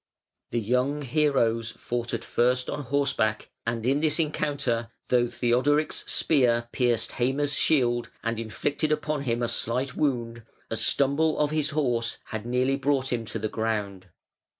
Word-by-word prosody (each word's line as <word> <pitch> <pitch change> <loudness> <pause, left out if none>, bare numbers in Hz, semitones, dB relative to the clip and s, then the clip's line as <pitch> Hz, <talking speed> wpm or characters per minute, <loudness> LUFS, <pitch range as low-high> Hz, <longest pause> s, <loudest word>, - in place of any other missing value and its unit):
The 120 - -1
young 125 +6 0
heroes 120 -5 +1
fought 120 0 -4
at - - -3
first 125 +1 +1
on 145 - -3
horseback, 125 -5 0 0.2
and 115 -1 -2
in 135 +3 +2
this 155 -1 +2
encounter, 145 -7 -1 0.2
though 120 -1 +3
Theodoric's 130 +6 +1
spear 120 -5 +2
pierced 120 -3 +1
Heime's 140 +4 +1
shield 120 -6 +2
and 115 0 -1
inflicted 145 +7 -2
upon 150 -1 -1
him 120 -1 0
a - - +1
slight 130 +5 0
wound, 120 -5 -1 0.3
a - - 0
stumble 145 +3 +2
of 150 0 +1
his 155 -1 +1
horse 120 -6 0
had 110 +1 -6
nearly 125 +2 +1
brought 135 -2 0
him 115 -2 -2
to 110 +1 -4
the 110 0 -2
ground. 105 -4 -3
125 Hz, 150 wpm, -26 LUFS, 115-145 Hz, 0.3 s, though